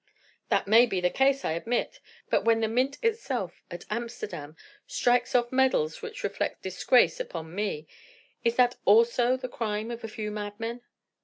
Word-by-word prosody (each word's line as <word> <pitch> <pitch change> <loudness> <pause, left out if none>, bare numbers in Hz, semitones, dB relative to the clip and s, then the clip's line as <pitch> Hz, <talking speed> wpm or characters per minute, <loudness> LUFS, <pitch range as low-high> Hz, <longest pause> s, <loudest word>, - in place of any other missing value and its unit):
"That - - +2
may 230 +4 +6
be 195 -5 -1
the 180 0 +1
case, 275 0 +2
I - - 0
admit. 235 - -2 0.3
But - - +3
when 225 0 +3
the 220 - +2
mint 255 +5 0
itself, 270 - -2
at 175 0 -8
Amsterdam, 210 -10 -5 0.3
strikes 245 - +1
off 240 -1 +2
medals 255 -12 +1
which - - -7
reflect 200 0 -3
disgrace 245 - +3
upon 165 - -6
me, 195 -6 -3 0.6
is 235 0 +2
that 245 0 +3
also 235 +4 +4
the 255 - -5
crime 220 -2 -3
of 235 0 -7
a - - -3
few 215 -1 -5
madmen?" 215 +3 -5
230 Hz, 165 wpm, -27 LUFS, 205-250 Hz, 0.6 s, may